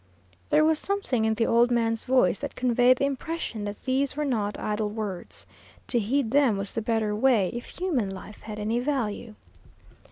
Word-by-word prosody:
There 310 - +4
was 315 -1 +3
something 385 - -1
in 220 0 +1
the 230 - +1
old 235 +2 +4
man's 230 -2 0
voice 250 -8 +3
that - - -5
conveyed 250 0 +4
the 275 - +1
impression 275 -5 -3
that 205 0 -6
these 270 +1 0
were 300 - 0
not 215 -6 -1
idle 210 0 -1
words. 205 -4 -6 0.4
To 240 - +3
heed 235 +2 0
them 270 -7 +3
was 195 0 -3
the 225 - -2
better 220 -1 0
way, 215 -5 +3
if 240 0 -6
human 305 - 0
life 195 +2 -9
had 215 -1 -7
any 215 +3 -1
value. 240 -5 -2
230 Hz, 185 wpm, -26 LUFS, 210-265 Hz, 0.4 s, There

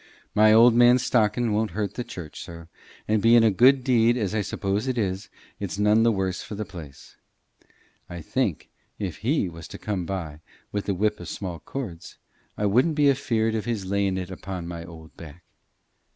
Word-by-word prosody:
My 110 +1 +5
old 115 +2 +7
man's 120 +1 +5
stockin' 110 0 +1
won't 105 -3 -1
hurt 105 -2 -2
the 125 - -4
church, 85 -9 -9
sir, 85 -1 -10 0.4
and, 110 -1 +2
bein' 115 +1 +6
a 110 - +5
good 130 +6 +5
deed 120 -2 +3
as 105 -4 -2
I 110 - +1
suppose 100 +3 -2
it 130 -1 -1
is, 95 -3 -2 0.3
it's 100 -1 -4
none 105 +2 +4
the 115 0 +4
worse 95 -3 -2
for 105 - -7
the 105 +1 -4
place. 80 -9 -12 0.9
I 85 -1 -7
think, - - -2 0.3
if 95 -7 -4
He 125 -1 0
was 85 -2 -9
to - - -9
come 95 -5 -3
by 80 -6 -5 0.3
wi' 100 - -1
the 100 -1 -2
whip 105 +3 0
o' - - -7
small 90 -4 -6
cords, 90 - -7 0.4
I 105 - -1
wouldn't 125 +10 +3
be 145 -1 +4
afeared 115 -4 0
of 110 -1 -2
his 115 -5 -3
layin' 100 0 0
it 95 0 -5
upo' 95 -1 -6
my 85 0 -6
old 80 -2 -13
back. 80 +1 -12
105 Hz, 195 wpm, -25 LUFS, 90-115 Hz, 0.9 s, old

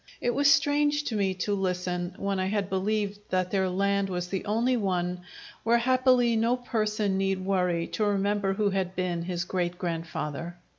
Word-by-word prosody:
It 240 - 0
was 285 +2 +4
strange 290 +1 +3
to 235 - -3
me 195 -2 +1
to 205 - 0
listen, 180 -2 -2
when 195 -1 -1
I 185 - 0
had 200 -1 -1
believed 205 +1 -1
that 185 -1 0
their 190 -2 +1
land 200 +1 +1
was 180 -1 -3
the 190 0 -2
only 230 +5 +1
one 180 -4 -1 0.4
where 235 +1 +3
happily 255 -1 +3
no 230 +3 +2
person 215 -5 -1
need 195 -1 0
worry 180 -3 +1
to 215 - -1
remember 200 -1 +1
who 205 0 +1
had 190 -1 -2
been 180 -2 -1
his 175 0 -2
great 175 0 -2
grandfather. 165 -1 -4
195 Hz, 180 wpm, -27 LUFS, 180-215 Hz, 0.4 s, was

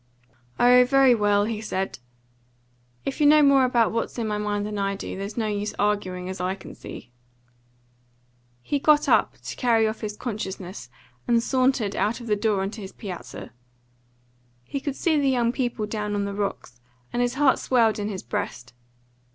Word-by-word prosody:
"Oh, 250 +1 +7
very 265 0 +5
well," 205 -2 +2
he 220 -1 -3
said. 190 - -3 1.1
"If 275 +3 -3
you 295 - +6
know 300 0 +7
more 275 -2 +5
about 240 -3 +2
what's 230 +2 -3
in 230 -2 -2
my 210 -1 -1
mind 205 -1 -1
than 210 -1 -4
I 200 0 0
do, - - -6
there's 200 +3 -6
no 225 - 0
use 210 0 -2
arguing, 185 -3 -1
as 185 -1 -5
I 185 +1 -1
can 195 - -11
see." - - -10 1.5
He 285 - -1
got 300 +1 +4
up, - - +3
to - - -6
carry 230 -3 +3
off 220 0 -4
his 210 -1 -5
consciousness, 190 - -6 0.4
and 235 -1 +3
sauntered 255 -5 +1
out 215 +4 0
of 240 - -9
the 215 -2 +1
door 205 -2 0
on 195 - -3
to 220 - -8
his 190 - -8
piazza. 190 -6 -8 1.1
He 275 - -4
could 280 -1 -4
see 315 -1 +1
the 275 -1 +2
young 240 -3 +2
people 240 -4 -2
down 210 -1 -3
on 200 0 -1
the 200 - -4
rocks, 195 -12 -4 0.3
and 240 - 0
his 245 0 0
heart 280 -1 +3
swelled 230 -4 +2
in 205 0 -2
his 195 -3 -5
breast. 120 +1 -5
215 Hz, 185 wpm, -25 LUFS, 200-250 Hz, 1.5 s, Oh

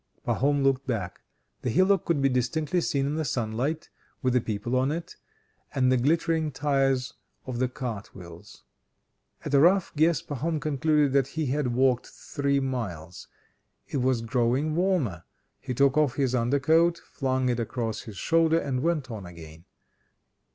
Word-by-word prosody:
Pahom 140 +1 +1
looked 135 0 +1
back. 105 -8 -3 0.4
The 125 - -2
hillock 185 - +3
could 150 -5 +1
be - - +5
distinctly 145 +7 0
seen 140 -4 0
in 145 - -1
the 160 - 0
sunlight, 125 +4 -2 0.3
with 130 -1 +2
the 125 - +3
people 115 +3 -3
on 130 +2 +2
it, 165 +2 -5 0.6
and 130 -1 +3
the 130 - +4
glittering 160 +3 +1
tires 135 -2 0 0.3
of 125 -2 -4
the 130 - +2
cartwheels. 100 -9 -8 0.8
At - - -4
a 140 - +6
rough 180 +4 +3
guess 160 +2 +3
Pahom 155 +3 -2
concluded 150 -1 +1
that 135 -2 +3
he 160 - 0
had 130 -2 -1
walked 130 -1 +2
three 140 -1 -2
miles. 100 - -5 0.6
It - - -2
was 125 -2 +1
growing 125 +6 0
warmer; 165 - 0 0.4
he 130 -2 -5
took 140 +1 +3
off 145 -5 +2
his 135 -3 0
under 125 +3 +1
coat, 165 +5 +3
flung 130 -5 -2
it 120 -1 0
across 115 -1 -3
his 110 -5 -10
shoulder, 165 0 +3
and 135 -5 -1
went 155 -5 -1
on 105 -5 -7
again. 80 -1 -12
135 Hz, 160 wpm, -27 LUFS, 120-150 Hz, 0.8 s, a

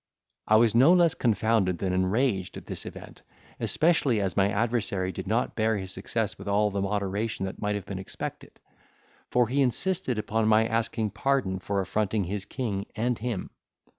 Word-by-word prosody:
I 110 - +5
was 110 0 +5
no 130 +9 +6
less 175 -3 +4
confounded 110 -5 +1
than 95 0 -1
enraged 95 +1 0
at - - -10
this - - -6
event, - - -10 0.4
especially 155 -8 +2
as 95 -2 -1
my 100 0 +3
adversary 105 -4 0
did 95 0 -7
not 115 +4 0
bear 110 -1 +1
his 95 -1 -5
success 105 +3 -3
with - - -9
all 105 +1 +2
the 100 0 -2
moderation 100 +1 -1
that 95 - -7
might 105 -1 0
have 100 - -5
been 95 -2 -5
expected; 95 - -7 0.7
for 125 -1 +3
he 135 +4 +1
insisted 135 - 0
upon 110 +1 0
my 110 +1 +5
asking 115 -1 -1
pardon 130 -9 0
for 100 +1 -1
affronting 105 +1 0
his 100 +2 -4
king 105 -4 -3
and 120 +2 -1
him. 115 -4 -4
110 Hz, 175 wpm, -27 LUFS, 95-120 Hz, 0.7 s, no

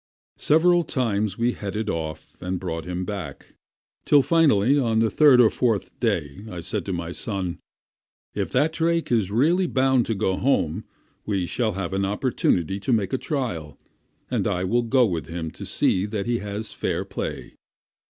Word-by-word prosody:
Several 175 +3 +4
times 110 - -1
we 120 +1 +2
headed 105 0 -4
him - - 0
off 80 -1 -6
and 90 0 -3
brought 80 -3 -4
him 90 +1 -3
back, 90 -9 -7 0.5
till 145 -2 +5
finally 140 -6 +4
on 115 -4 +1
the 115 0 +2
third 145 -5 +6
or 115 -3 +6
fourth 115 -6 0
day 75 +7 -1
I 90 - -6
said 95 +2 -3
to - - -1
my 85 -1 -3
son, 95 -3 -3 0.7
"If - - -3
that 150 +5 +2
drake 165 -1 0
is 110 -6 +2
really 165 - +2
bound 130 -4 +2
to 115 - 0
go 95 -2 0
home, 90 - 0 0.4
he 100 -4 0
shall 110 +3 -1
have 95 -1 -4
an 95 0 0
opportunity 100 - 0
to 115 - -2
make 105 -5 +1
the 130 - -1
trial, 90 - -3 0.5
and - - -1
I 90 0 -1
will 120 +6 +2
go 125 +2 +3
with 85 -6 -3
him 85 -1 -5
to - - -9
see 95 +2 +1
that 105 -2 -3
he 120 0 0
has 105 +1 -5
fair - - -2
play." - - -5
105 Hz, 180 wpm, -24 LUFS, 90-125 Hz, 0.7 s, third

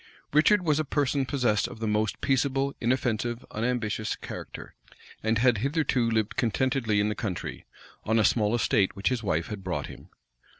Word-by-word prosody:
Richard 180 +6 +5
was 155 -3 +2
a - - +2
person 140 -2 0
possessed 120 -8 +1
of - - -9
the 110 - -2
most 105 0 0
peaceable, 135 +1 +1
inoffensive, 120 -1 -1
unambitious 110 -2 -1
character; - - -8 0.5
and 110 +1 +1
had 120 -2 +3
hitherto 135 -2 +1
lived 110 -2 0
contentedly 120 -2 +1
in 105 +1 +2
the - - 0
country, 95 -5 -5 0.4
on 110 +1 +1
a 110 - +4
small 105 +1 +2
estate 115 -4 +2
which 100 0 0
his 125 -3 -1
wife 85 -6 -1
had 105 -3 -6
brought 90 -1 -2
him. - - -12
115 Hz, 170 wpm, -27 LUFS, 105-135 Hz, 0.5 s, Richard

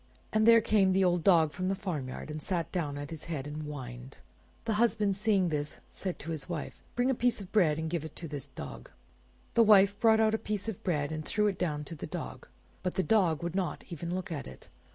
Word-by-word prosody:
And 215 +1 +3
there 230 0 +8
came 205 -4 +3
the 190 +1 +3
old 175 -2 +2
Dog 165 -5 +5
from 185 +3 -3
the 195 - +1
farmyard, 155 -8 -4
and 155 0 -5
sat 170 -2 -2
down 150 -6 -2
at 145 +2 -6
his 160 -2 -6
head 155 -5 -4
and 150 +1 -5
whined. 130 -3 -7 0.5
The 225 - +1
husband 210 -4 +2
seeing 200 -3 +2
this, 150 -1 -2
said 185 -2 -4
to 165 - -6
his 160 0 -5
wife— 165 -4 -5
"Bring 245 +2 +2
a - - +2
piece 240 -1 +1
of 195 -2 -9
bread 165 -8 +4
and 160 0 -2
give 165 -1 -2
it 155 -1 -8
to 165 - -6
this 145 -3 -5
Dog." - - -9 0.6
The 235 - +5
wife 200 -2 +6
brought 220 -1 +5
out 220 -1 +4
a 220 - +1
piece 210 0 -3
of 220 -5 -5
bread, 150 -5 0
and 155 0 -3
threw 210 +6 +1
it 200 -2 0
down 150 -4 -1
to 150 - -8
the 155 - -6
Dog; - - -6 0.3
but 180 - -2
the 190 - +2
Dog 180 -8 +2
would 170 -1 -2
not 190 -2 -2
even 170 +2 -3
look 185 -1 -4
at 150 -4 -4
it. 65 - -12
175 Hz, 240 wpm, -30 LUFS, 150-205 Hz, 0.6 s, there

